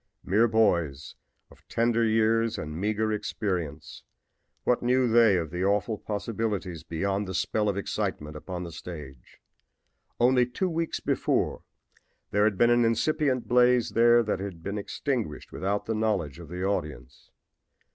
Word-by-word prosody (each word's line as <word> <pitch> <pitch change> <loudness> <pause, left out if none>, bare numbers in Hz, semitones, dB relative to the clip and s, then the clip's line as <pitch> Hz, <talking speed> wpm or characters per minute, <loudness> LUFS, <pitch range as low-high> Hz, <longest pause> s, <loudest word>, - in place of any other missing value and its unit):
Mere 110 +5 +3
boys 85 -11 +1 0.4
of - - -19
tender 115 0 +1
years 115 0 +2
and 75 0 -5
meager 105 +4 0
experience, 90 -8 -3 0.6
what 125 - +2
knew 125 +1 +2
they 115 -4 +5
of 80 -3 -3
the 90 +2 -2
awful 100 +2 0
possibilities 105 -5 -3
behind 100 +4 -2
the 95 - -4
spell 105 +2 0
of 100 - -2
excitement 75 -6 -3
upon 90 +3 -6
the 85 - -7
stage? 75 -6 -10 0.8
Only 125 0 +4
two 180 +9 -2
weeks 165 0 -2
before - - 0 0.7
there 105 +1 +3
had 105 -3 +1
been 120 +3 +4
an 120 0 +4
incipient 130 +2 +1
blaze 125 -1 +4
there 120 +1 +5
that 105 -4 -1
had 95 -4 -7
been 100 +3 -3
extinguished 115 - -3
without 100 +2 -2
the 110 - -1
knowledge 100 -9 -1
of 85 - -10
the 90 +1 -5
audience. 75 -8 -4
105 Hz, 145 wpm, -27 LUFS, 90-115 Hz, 0.8 s, they